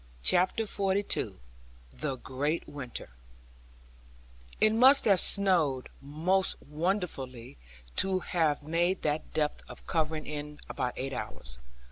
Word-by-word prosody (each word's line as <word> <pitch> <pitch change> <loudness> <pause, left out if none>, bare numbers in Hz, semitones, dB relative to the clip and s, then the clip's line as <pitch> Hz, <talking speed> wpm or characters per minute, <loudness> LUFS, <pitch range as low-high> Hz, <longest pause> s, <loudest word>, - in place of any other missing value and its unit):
CHAPTER 185 - +3
XLII 200 0 0 0.6
THE 65 - -3
GREAT 145 +6 -3
WINTER 130 - -7 1.5
It 215 0 +4
must 260 +5 +6
have 200 -4 +5
snowed 170 -10 +4
most 165 +7 0
wonderfully 145 - -4 0.4
to 190 0 +3
have 155 -5 0
made 170 +4 0
that 150 +1 -2
depth 150 -1 -1
of - - -12
covering 160 -2 -1
in 150 0 -6
about 125 - -3
eight 135 +1 -4
hours. - - -7
155 Hz, 110 wpm, -29 LUFS, 140-190 Hz, 1.5 s, must